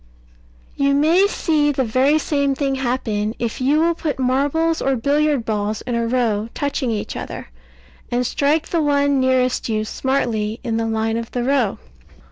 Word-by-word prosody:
You 280 0 +2
may 330 +7 +4
see 305 -7 +1
the 265 -2 0
very 260 +6 +2
same 280 -2 0
thing 275 0 -1
happen, 240 -5 -2
if 235 +1 -3
you 285 +4 +3
will 335 +1 +3
put 320 -3 -3
marbles 285 +6 +1
or 270 0 +1
billiard 285 0 +1
balls 210 -1 -2
in 245 - -4
a 235 0 0
row 230 -3 0
touching 285 -2 -1
each 215 -2 -3
other, - - -7 0.6
and 245 +1 0
strike 295 +5 0
the 335 - +1
one 285 -1 +2
nearest 255 -2 +1
you 215 -1 0
smartly 225 -4 -1
in 230 -3 -1
the 225 0 -1
line 225 0 -1
of 230 0 -5
the 245 - -2
row. 255 -5 +1
260 Hz, 170 wpm, -20 LUFS, 230-285 Hz, 0.6 s, may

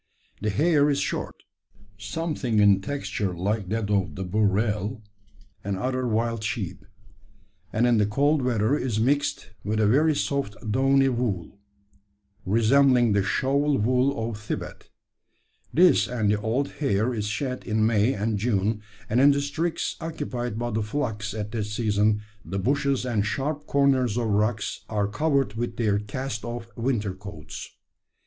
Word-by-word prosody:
The 105 - 0
hair 150 - +3
is 140 - +1
short, - - -3 0.5
something 120 +3 -2
in 100 -2 +5
texture 105 -6 -3
like 100 +1 -1
that 110 -1 -1
of 100 -3 0
the 95 - -4
burrell 105 +3 0 0.6
and 100 -1 -2
other 130 +4 -1
wild 115 0 0
sheep; 105 - -4 0.8
and 115 +3 +2
in 120 -2 +4
the 105 - +3
cold 145 +7 +2
weather 120 0 +1
is 125 -7 -1
mixed 140 -4 0
with 110 +1 -1
a 110 - +3
very 150 +8 +4
soft 140 -7 -1 0.2
downy 135 +3 +4
wool, 110 -7 -2 0.9
resembling 120 +3 +4
the 100 - +3
shawl 140 +7 +1
wool 125 +1 +1
of 110 -2 -5
Thibet. 110 - -6 0.8
This 180 +3 +5
and 110 -4 0
the 105 0 0
old 120 +6 0
hair 125 -4 +1
is 105 -2 -2
shed 125 +4 -3
in 110 -1 +1
May 110 +2 +3
and 105 +1 -1
June; 105 -1 0 0.3
and 120 +4 +2
in 140 - +7
districts 145 +4 -1
occupied 130 -8 -4
by 120 +1 -2
the 110 0 0
flocks 105 -3 -3
at 105 -1 -4
that 110 -3 -2
season 105 -1 +1 0.2
the 95 +4 -4
bushes 135 +5 +1
and 115 -5 0
sharp 140 +7 -2
corners 135 -5 +2
of 115 -2 0
rocks 105 +1 0
are 105 -2 0
covered 140 0 +1
with 120 +2 -4
their 105 -3 +2
cast 110 +2 -5
off 120 0 -6
winter 115 -5 -1
coats. 95 -5 -9
115 Hz, 150 wpm, -25 LUFS, 105-135 Hz, 0.9 s, in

